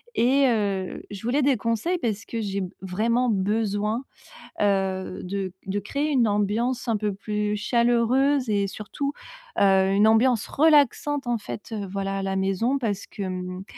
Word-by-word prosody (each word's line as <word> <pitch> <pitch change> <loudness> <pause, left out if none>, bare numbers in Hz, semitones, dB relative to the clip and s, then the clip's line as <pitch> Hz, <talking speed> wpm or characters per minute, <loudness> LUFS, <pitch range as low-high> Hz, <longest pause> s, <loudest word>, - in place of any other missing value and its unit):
Et 270 +4 +4
heu, 200 -5 -1
je 200 -2 -7
voulais 250 +6 +1
des 275 -1 +3
conseils 230 - -1
parce 225 - -3
que 230 - -4
j'ai 200 -2 -2
b 185 - -4
vraiment 230 +7 0
besoin, 210 +2 0 0.6
heu, 190 -2 0
de 190 0 -4
de 195 +2 -1
créer 280 +9 -2
une 250 -5 +3
ambiance 215 +5 0
un 225 -2 +1
peu 210 -1 -1
plus 210 +1 -2
chaleureuse 240 +4 +2
et 200 -1 +2
surtout, 245 +8 -4 0.5
heu, 195 -1 +4
une 205 +2 +5
ambiance 225 +1 +3
relaxante, 290 -2 +3
en 240 -1 +1
fait, 210 +1 -8
heu, 210 -2 -3
voilà, 195 0 -2
à - - -3
la 195 0 -1
maison. 195 +8 0
Parce 205 -5 -2
que, - - -9
hem, 185 0 -5
210 Hz, 165 wpm, -25 LUFS, 195-245 Hz, 0.6 s, une